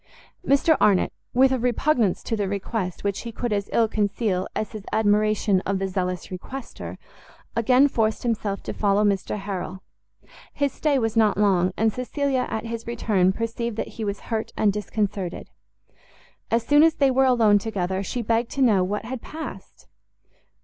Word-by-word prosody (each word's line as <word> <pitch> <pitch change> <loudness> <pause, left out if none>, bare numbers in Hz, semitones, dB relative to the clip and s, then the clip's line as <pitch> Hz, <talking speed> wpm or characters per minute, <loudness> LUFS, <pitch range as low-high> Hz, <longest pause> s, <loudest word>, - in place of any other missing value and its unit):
Mr 280 +3 +4
Arnott, 200 -3 +3 0.2
with 265 +1 +4
a 260 - +1
repugnance 245 -3 +1
to 225 - -2
the 205 -2 -1
request 200 -2 -3
which 200 -1 -1
he 235 - -6
could 235 0 -2
as 200 -1 -2
ill 230 -1 +3
conceal 205 -3 -1
as 215 - -2
his 215 -3 -8
admiration 210 -2 +2
of 195 0 -1
the 195 0 -1
zealous 180 -1 -3
requester, 235 +8 -7 0.6
again 250 +4 +4
forced 220 -5 0
himself 215 -4 -2
to - - -4
follow 205 0 +2
Mr 200 0 0
Harrel. 190 -2 -5 0.7
His 285 -1 0
stay 295 -3 +1
was 225 -3 -1
not 215 -3 +3
long, 185 -3 +3
and 220 -1 +2
Cecilia 260 +1 -1
at 220 - -3
his 230 0 -5
return 205 -6 +2
perceived 230 +2 -3
that - - -3
he - - -1
was 200 -1 -3
hurt 225 -2 -3
and 205 -2 +3
disconcerted. 205 -3 -3 1.0
As 230 0 +1
soon 290 0 +5
as 325 0 +5
they 275 -2 +3
were 265 +1 +3
alone 225 -5 +4
together, 190 -3 -2
she 235 +4 -3
begged 230 +2 0
to 275 - +1
know 205 -7 +4
what 210 +4 -3
had 250 +1 -5
passed? 315 0 -9
220 Hz, 170 wpm, -24 LUFS, 200-240 Hz, 1.0 s, soon